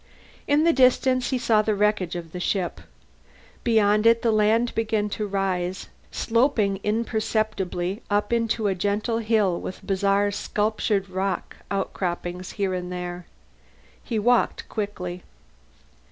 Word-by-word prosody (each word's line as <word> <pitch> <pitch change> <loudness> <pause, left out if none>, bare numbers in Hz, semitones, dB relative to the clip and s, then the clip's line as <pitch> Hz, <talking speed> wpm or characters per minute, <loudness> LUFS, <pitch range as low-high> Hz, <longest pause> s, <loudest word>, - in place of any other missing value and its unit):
In 290 +2 +3
the 335 0 +4
distance 255 -1 +3
he 260 - +1
saw 230 -3 +3
the 215 0 0
wreckage 205 -4 +1
of 170 -2 -6
the 180 - -6
ship; 180 0 -1 0.8
beyond 215 -2 +3
it 230 +1 +4
the 230 - +3
land 220 +3 +2
began 220 -2 0
to 210 0 -3
rise, 190 -2 -2 0.2
sloping 225 -5 +1
imperceptibly 215 -3 -1
up 205 +2 +1
into 230 -1 0
a 200 - +2
gentle 205 +5 -1
hill 215 -5 +1
with 185 - -7
bizarre 200 +1 +2
sculptured 205 -1 -1
rock 190 +1 -3
outcroppings 180 -2 -3
here 195 -2 -1
and 180 0 -4
there. 180 -1 -5 0.8
He 230 - -3
walked 240 +3 +2
quickly. 180 -4 -4
205 Hz, 130 wpm, -24 LUFS, 185-225 Hz, 0.8 s, the